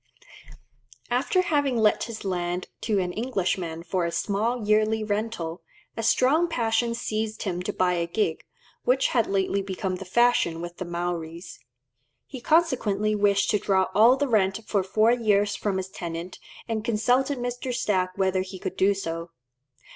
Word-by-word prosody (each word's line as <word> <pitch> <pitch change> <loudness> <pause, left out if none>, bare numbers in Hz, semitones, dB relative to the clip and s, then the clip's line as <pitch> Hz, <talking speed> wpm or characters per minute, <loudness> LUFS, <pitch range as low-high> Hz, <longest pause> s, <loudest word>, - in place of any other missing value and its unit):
After 280 +9 +2
having 285 -7 +1
let 215 -2 +3
his 225 -2 -8
land 180 -1 -2
to 215 -3 0
an 180 -2 -1
Englishman 185 -8 -2
for 175 +1 -1
a 170 - -1
small 215 +5 -1
yearly 215 +1 +2
rental, 205 -5 -3 0.3
a - - -3
strong 270 +9 +3
passion 230 -4 0
seized 220 -1 -3
him 180 -3 -2
to 180 - -2
buy 180 -1 +1
a 170 -1 -1
gig, 170 -3 -1 0.4
which 255 +2 +2
had 235 -3 +2
lately 195 0 0
become 190 -1 -3
the 195 - -8
fashion 215 -5 +2
with 175 +1 -7
the 185 - -4
Maoris. 170 0 -5 0.7
He 260 -3 -9
consequently 240 -10 +2
wished 200 -1 +2
to 210 - +2
draw 190 -1 +1
all 230 +5 +6
the 285 +1 0
rent 205 -3 +1
for 200 - +1
four 215 +4 +3
years 205 -4 +2
from 200 -2 -1
his 190 0 -4
tenant, 170 0 -6 0.3
and 220 -2 -2
consulted 245 +5 +1
Mr. 245 +1 -3
Stack 185 -6 0
whether 190 -1 +1
he 190 0 -7
could 185 - -5
do 195 +1 +3
so. 165 -3 -4
205 Hz, 160 wpm, -25 LUFS, 185-230 Hz, 0.7 s, all